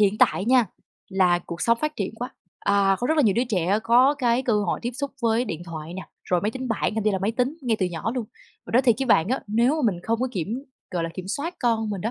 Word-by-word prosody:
hiện 205 Hz, 0 st, +3 dB
tại 190 Hz, -, +3 dB
nha 245 Hz, -1 st, +4 dB, 0.4 s
là 185 Hz, -2 st, +3 dB
cuộc 170 Hz, 0 st, -8 dB
sống 230 Hz, 0 st, +3 dB
phát 305 Hz, 0 st, -2 dB
triển 200 Hz, +1 st, -3 dB
quá, 245 Hz, +3 st, -5 dB, 0.3 s
à, 200 Hz, -1 st, +3 dB
có 245 Hz, -, -1 dB
rất 315 Hz, -, +1 dB
là 300 Hz, -, +5 dB
nhiều 210 Hz, -6 st, +3 dB
đứa 240 Hz, -, +2 dB
trẻ 190 Hz, -1 st, +1 dB
có 250 Hz, +5 st, +5 dB
cái 245 Hz, -1 st, +2 dB
cơ 250 Hz, -, 0 dB
hội 205 Hz, -4 st, 0 dB
tiếp 240 Hz, -, -1 dB
xúc 280 Hz, +2 st, -3 dB
với 230 Hz, +1 st, +2 dB
điện 175 Hz, -8 st, -5 dB
thoại 165 Hz, 0 st, -7 dB
nè, 190 Hz, -, -5 dB, 0.2 s
rồi 180 Hz, -1 st, +1 dB
máy 210 Hz, -, 0 dB
tính 260 Hz, +2 st, -5 dB
bảng, 225 Hz, -2 st, 0 dB
thậm 220 Hz, -1 st, -1 dB
chí 215 Hz, -, +4 dB
là 195 Hz, -, 0 dB
máy 195 Hz, +3 st, 0 dB
tính 255 Hz, +5 st, -1 dB
ngay 235 Hz, -4 st, +1 dB
từ 185 Hz, -, +3 dB
nhỏ 175 Hz, +5 st, -3 dB
luôn. 250 Hz, -3 st, -2 dB, 0.4 s
Mình -, -, -8 dB
nói 250 Hz, +3 st, +5 dB
thiệt 240 Hz, -3 st, +4 dB
với 270 Hz, -, -1 dB
bạn 185 Hz, -7 st, +4 dB
á, 260 Hz, +3 st, 0 dB
nếu 230 Hz, +4 st, +3 dB
mà 260 Hz, -10 st, +2 dB
mình 175 Hz, -, -8 dB
không 230 Hz, +3 st, -1 dB
có 260 Hz, -, 0 dB
kiểm, 215 Hz, +6 st, -3 dB, 0.3 s
gọi 175 Hz, -2 st, -1 dB
là, 165 Hz, -, -2 dB
kiểm 185 Hz, 0 st, -7 dB
soát 295 Hz, -, -3 dB
con 225 Hz, -3 st, +1 dB
mình 200 Hz, -3 st, -3 dB
đó, 225 Hz, -, -1 dB
220 Hz, 290 wpm, -24 LUFS, 190-250 Hz, 0.4 s, là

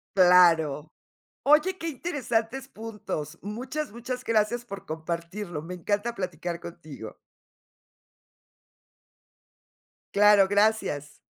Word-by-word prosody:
Claro. 165 Hz, -5 st, +5 dB, 0.5 s
Oye, 305 Hz, +6 st, +4 dB
qué 330 Hz, -, -4 dB
interesantes 265 Hz, -5 st, -2 dB
puntos, 205 Hz, -8 st, -6 dB
muchas 255 Hz, +8 st, -4 dB
muchas 250 Hz, +2 st, -5 dB
gracias 230 Hz, +2 st, +1 dB
por 200 Hz, -5 st, -8 dB
compartirlo, 170 Hz, +2 st, -5 dB
me 180 Hz, +3 st, -7 dB
encanta 205 Hz, +6 st, -1 dB
platicar 175 Hz, -4 st, -4 dB
contigo. 155 Hz, -10 st, -9 dB, 3.0 s
Claro, 205 Hz, -1 st, +6 dB
gracias. 205 Hz, -8 st, +1 dB
205 Hz, 85 wpm, -27 LUFS, 170-235 Hz, 3.0 s, Claro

